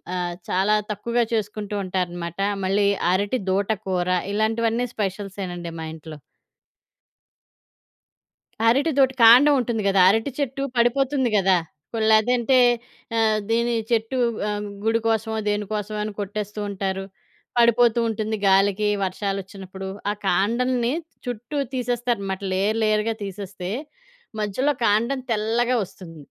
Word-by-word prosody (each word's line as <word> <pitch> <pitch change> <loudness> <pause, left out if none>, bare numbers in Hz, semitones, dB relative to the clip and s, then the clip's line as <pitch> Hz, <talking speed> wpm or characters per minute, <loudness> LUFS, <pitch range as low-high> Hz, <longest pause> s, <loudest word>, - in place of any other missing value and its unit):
ఆహ్, 175 -1 -2 0.2
చాలా 195 +3 +2 0.2
తక్కువగా 235 +4 0
చేసుకుంటూ 210 -1 -2
ఉంటారనమాట. 175 -1 -3 0.3
మళ్ళీ 200 +1 +2 0.2
అరటిదూట 200 0 0 0.2
కూర. 180 -1 0 0.3
ఇలాంటివన్నీ 225 +3 +1
స్పెష‌ల్సేనండి 190 -4 -4
మా 160 - -4
ఇంట్లో. 155 -1 -10 2.5
అరటిదూట. 275 +1 +3
కాండవుంటుంది 245 -2 +6
గదా! 195 -1 +4
అరటి 225 +6 +1
చెట్టు 275 0 -2
పడిపోతుంది 260 +2 +2
గదా! 190 -1 +4 0.4
పొల్లేదంటే 230 +3 +3 0.6
ఆహ్, 220 -1 +3
దీనీ 235 +1 +1 0.2
చెట్టూ 230 +3 0 0.3
ఆహ్, 205 0 -3 0.2
గుడి 225 +1 +2
కోసమో, 220 0 0
దేని 205 0 -1
కోసమో 210 0 -3
అని 210 -1 -4
కొట్టేస్తూ 210 +1 -5
ఉంటారు. 195 -1 -3 0.5
పడిపోతూ 235 0 +4
ఉంటుంది 220 0 -2
గాలికీ 195 +2 +3 0.2
వర్షాలొచ్చినప్పుడు. 195 0 -4 0.2
ఆ‌ - - +2 0.2
కాండలని 235 +6 +1 0.3
చుట్టూ 245 +4 -5 0.2
తీసేస్తారనమాట. 240 -6 -2
లేయర్ 210 +4 +1
లేయర్‌గా 215 +1 +1
తీసేస్తే, 190 -2 -6 0.7
మధ్యలో 255 +8 0
కాండం 235 +6 +2
తెల్లగా 230 +3 +1
ఒస్తుంది. 165 -4 -12
215 Hz, 105 wpm, -23 LUFS, 195-235 Hz, 2.5 s, కాండవుంటుంది